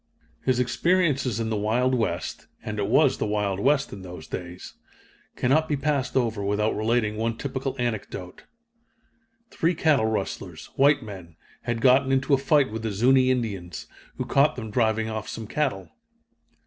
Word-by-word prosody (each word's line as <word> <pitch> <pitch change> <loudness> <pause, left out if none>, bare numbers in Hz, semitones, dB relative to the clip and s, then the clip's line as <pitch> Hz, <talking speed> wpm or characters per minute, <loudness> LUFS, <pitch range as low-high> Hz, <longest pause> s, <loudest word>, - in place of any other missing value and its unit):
His 130 -2 +1
experiences 135 - +1
in 110 -1 -2
the - - 0
Wild 115 +5 +1
West 90 -9 -2 0.2
(and 105 -2 -4
it 100 - 0
was 140 +5 +3
the - - 0
Wild 105 -2 -1
West 140 +5 +2
in 100 - -8
those 90 -3 -9
days) 90 +2 -7 0.6
cannot 155 +5 +2
be 145 - +1
passed 140 -2 0
over 115 -5 0
without 105 +2 0
relating 110 -1 0
one 115 +1 -1
typical 135 0 -3
anecdote. 110 -6 -4 1.1
Three 165 +2 +1
cattle 150 -8 +3
rustlers, 95 -6 -4
white 140 0 +4
men, 95 -6 -10 0.3
had 120 -1 -2
gotten 130 +1 +4
into 135 +2 +2
a 135 - +5
fight 140 -3 +3
with 110 0 -4
the 110 -1 -2
Zuni 130 +5 +4
Indians, 100 -9 -2 0.3
who - - -2
caught 140 +2 +3
them 110 -4 -6
driving 110 -1 +1
off 110 -1 -4
some 110 - -6
cattle. 105 - -2
115 Hz, 160 wpm, -25 LUFS, 105-135 Hz, 1.1 s, a